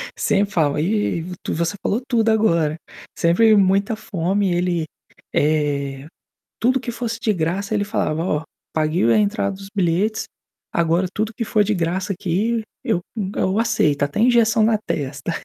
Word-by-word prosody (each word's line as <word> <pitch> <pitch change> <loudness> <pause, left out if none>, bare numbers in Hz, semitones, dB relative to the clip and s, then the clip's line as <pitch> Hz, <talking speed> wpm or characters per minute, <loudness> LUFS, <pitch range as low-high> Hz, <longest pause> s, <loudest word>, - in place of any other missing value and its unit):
sempre 200 0 +1
falava 150 -3 +1
eh, 195 -3 0 0.2
tu - - -2
você 170 +5 -1
falou 225 +5 0
tudo 230 -3 +2
agora. 170 -8 +2 0.4
Sempre 215 +6 +4
muita 200 +2 +3
fome, 195 -1 -1
ele, 175 -2 0 0.5
eh, 145 -2 0 0.5
tudo 255 +3 +2
que 240 -1 -5
fosse 230 -1 -4
de 215 -2 +1
graça, 185 +5 -2
ele 205 -1 +1
falava: 165 -6 -1
"Ó, 150 -3 -1 0.3
paguei 155 -3 +1
o 115 - +4
a - - +4
entrada 200 -2 0
dos 195 0 -11
bilhetes, 195 +4 +1 0.5
agora 170 +2 +2
tudo 220 +1 -2
que 230 - -3
for 210 -1 +2
de 210 +1 0
graça 180 +3 -1
aqui, 205 +6 -1 0.2
eu 220 -8 +1 0.4
eu 190 +3 +1
aceito, 150 -11 +2
até 145 +8 -2
injeção 230 -2 +4
na 220 -1 +3
testa." 145 -6 -4
195 Hz, 160 wpm, -21 LUFS, 165-220 Hz, 0.5 s, Sempre